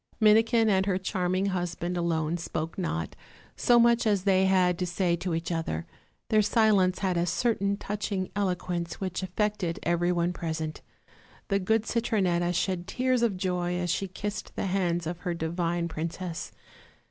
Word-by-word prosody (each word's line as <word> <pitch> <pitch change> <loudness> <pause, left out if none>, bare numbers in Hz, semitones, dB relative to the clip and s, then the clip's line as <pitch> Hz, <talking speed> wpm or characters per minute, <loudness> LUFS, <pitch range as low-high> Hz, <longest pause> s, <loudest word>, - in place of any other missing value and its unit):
Minikin 225 +1 +5
and 190 -2 +2
her 185 -2 +2
charming 185 0 -1
husband 175 -1 -2
alone 165 -2 0
spoke 165 -1 -4
not, 80 - -3 0.4
so 240 - +4
much 235 -1 +4
as 200 -3 +2
they 190 -1 +4
had 180 -2 +3
to 180 - -1
say 175 -1 +1
to 180 -1 -2
each 165 +2 -3
other; 160 - -2 0.4
their 215 -1 +5
silence 210 -4 +3
had 185 -2 +1
a 170 +1 +1
certain 200 -1 +1
touching 200 -2 -3
eloquence 180 -4 -2
which 185 -1 -3
affected 185 -2 -1
every 175 +1 +1
one 175 0 +1
present. 160 -2 -4 0.7
The 200 -1 +2
good 220 +3 +1
Citronetta 190 -7 +1
shed 180 0 -1
tears 255 +2 +1
of 225 -5 +1
joy 180 -1 -1
as 180 -1 -1
she 195 - -1
kissed 205 +3 -5
the - - -2
hands 175 -3 0
of 170 +1 -4
her 175 -3 -3
divine 170 +1 -1
princess. 165 +2 -5
180 Hz, 160 wpm, -28 LUFS, 170-200 Hz, 0.7 s, Minikin